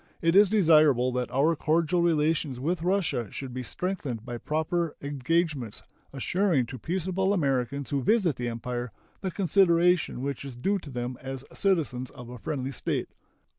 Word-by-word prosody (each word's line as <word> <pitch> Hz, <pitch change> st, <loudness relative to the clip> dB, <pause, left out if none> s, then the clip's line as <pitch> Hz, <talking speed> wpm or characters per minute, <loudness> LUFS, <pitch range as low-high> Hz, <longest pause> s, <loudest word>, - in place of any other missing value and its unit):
It 165 Hz, +1 st, +2 dB
is 200 Hz, 0 st, +7 dB
desirable 155 Hz, -, +5 dB
that 125 Hz, -1 st, -2 dB
our 150 Hz, +6 st, +2 dB
cordial 165 Hz, +3 st, +1 dB
relations 155 Hz, -5 st, +1 dB
with 165 Hz, +5 st, -1 dB
Russia 175 Hz, -, 0 dB
should 130 Hz, +3 st, -7 dB
be 130 Hz, -, -3 dB
strengthened 135 Hz, -, -4 dB
by 120 Hz, -1 st, -5 dB
proper 160 Hz, +3 st, -1 dB
engagements 140 Hz, -, -1 dB, 0.3 s
assuring 160 Hz, +1 st, +1 dB
to 130 Hz, +2 st, -8 dB
peaceable 185 Hz, -, 0 dB
Americans 140 Hz, -4 st, -1 dB
who 140 Hz, -1 st, +1 dB
visit 190 Hz, -, +2 dB
the 120 Hz, 0 st, -3 dB
Empire 120 Hz, +1 st, -4 dB, 0.3 s
the 190 Hz, -, -2 dB
consideration 180 Hz, -6 st, +3 dB
which 140 Hz, 0 st, -3 dB
is 135 Hz, -3 st, -7 dB
due 195 Hz, +11 st, 0 dB
to 160 Hz, -, -11 dB
them 125 Hz, -1 st, -4 dB
as 135 Hz, 0 st, -6 dB
citizens 150 Hz, -11 st, 0 dB
of 120 Hz, -1 st, -11 dB
a 125 Hz, -1 st, -9 dB
friendly 135 Hz, +1 st, -3 dB
state. 130 Hz, -, -2 dB
150 Hz, 160 wpm, -27 LUFS, 125-175 Hz, 0.3 s, is